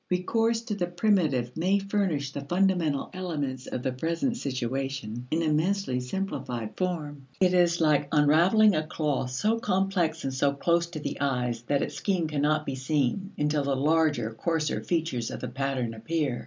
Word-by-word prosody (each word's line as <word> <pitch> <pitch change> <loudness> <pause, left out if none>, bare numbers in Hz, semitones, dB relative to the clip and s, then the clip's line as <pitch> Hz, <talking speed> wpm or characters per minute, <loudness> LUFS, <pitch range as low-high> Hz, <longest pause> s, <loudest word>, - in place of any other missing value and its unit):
Recourse 225 +5 +1
to 230 -3 -3
the 180 -4 -1
primitive 165 - +1
may 185 +5 +2
furnish 195 -9 -1
the 140 - -5
fundamental 175 -4 +1
elements 145 -8 -3
of 125 - -4
the 130 - 0
present 165 - -1
situation 130 - -3
in 165 +3 0
immensely 160 -2 +1
simplified 125 - -4
form. 150 -7 -3
It 185 -1 +4
is 175 -1 +3
like 150 -3 +3
unraveling 170 +8 +5
a 155 - +2
cloth 150 -5 -1
so 210 - 0
complex 190 -6 0
and 135 - -2
so 140 +1 +2
close 170 +4 +1
to 170 -2 -7
the 140 -1 -5
eyes 125 -4 0
that 140 -1 +2
its - - -4
scheme 185 -5 0
cannot 150 0 +1
be 135 - -3
seen, 145 +8 -1
until 150 0 +1
the 140 -1 0
larger 145 -5 +2
coarser 160 +5 -1
features 160 -9 -1
of - - -6
the 125 - -4
pattern 130 -2 -2
appear. 135 +2 -2
155 Hz, 170 wpm, -27 LUFS, 135-180 Hz, -, unraveling